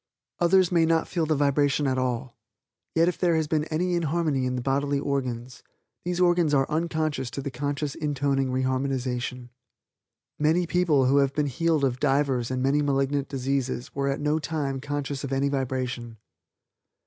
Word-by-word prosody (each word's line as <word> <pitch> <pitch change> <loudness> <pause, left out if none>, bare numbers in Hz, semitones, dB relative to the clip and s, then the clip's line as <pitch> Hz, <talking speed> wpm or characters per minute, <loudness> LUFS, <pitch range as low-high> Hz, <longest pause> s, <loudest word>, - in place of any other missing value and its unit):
Others 180 +1 +4
may 170 -2 +4
not 160 0 +2
feel 165 -3 -1
the 155 - +2
vibration 145 0 +2
at 130 -1 +1
all, 125 0 -2 0.6
yet 165 +1 +4
if 180 - -1
there 175 -2 +3
has 160 -1 +1
been 155 0 0
any 175 +3 -1
inharmony 155 -5 0
in 125 - -2
the 125 - -2
bodily 140 +1 0
organs, 130 -3 -3 0.4
these 180 0 -2
organs 175 -4 +3
are 135 -1 +2
unconscious 155 -4 -1
to 130 - -6
the 140 0 -4
conscious 140 +2 -2
intoning 140 -3 0
re 130 +1 0
harmonization. 130 -2 -2 0.9
Many 160 +4 +2
people 165 -6 +2
who 135 +2 +3
have 140 -1 +2
been 150 - +1
healed 160 +2 0
of 130 -2 +1
divers 135 -4 +1
and 130 0 -1
many 140 +2 +2
malignant 140 0 0
diseases 130 -2 -2
were 140 0 -1
at 140 0 -1
no 150 +1 +1
time 140 -3 -3
conscious 145 -1 -3
of 140 - -4
any 135 +1 +1
vibration. 130 -4 -3
140 Hz, 170 wpm, -26 LUFS, 130-155 Hz, 0.9 s, Others